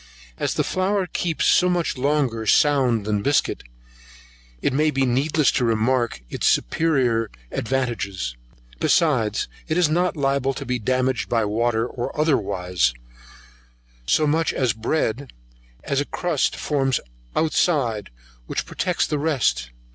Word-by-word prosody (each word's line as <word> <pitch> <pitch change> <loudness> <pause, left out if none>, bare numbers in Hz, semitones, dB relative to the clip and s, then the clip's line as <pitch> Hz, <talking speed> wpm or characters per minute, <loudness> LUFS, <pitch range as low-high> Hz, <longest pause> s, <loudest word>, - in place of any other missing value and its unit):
As - - -1
the - - +1
flour 190 +1 0
keeps 170 -1 -2
so 180 - +4
much 175 -2 0
longer 130 -5 0
sound 130 -5 +3
than 105 -1 0
biscuit, 140 +6 +1 1.0
it 130 - 0
may 155 +3 +3
be 135 -2 +1
needless 140 +4 +2
to 125 - 0
remark 115 - +1
its - - -1
superior 120 - +1 0.2
advantages; 110 - -2 0.4
besides, 115 -10 +2 0.2
it 160 0 0
is 175 -4 +3
not 175 +2 +1
liable 135 -1 0
to - - -6
be 125 0 -1
damaged 130 +2 0
by 115 -2 +1
water 115 +2 0
or 120 +3 -5
otherwise, 90 - +1 1.1
so 155 - +3
much 160 +2 +1
as 125 -5 +1
bread, 120 +2 -2 0.5
as 140 0 0
a - - -2
crust 170 -4 -1
forms 135 -4 0 0.4
outside, 140 - +1 0.4
which - - -2
protects 180 -2 -1
the 150 - -2
rest. 125 - 0
130 Hz, 130 wpm, -23 LUFS, 115-155 Hz, 1.1 s, so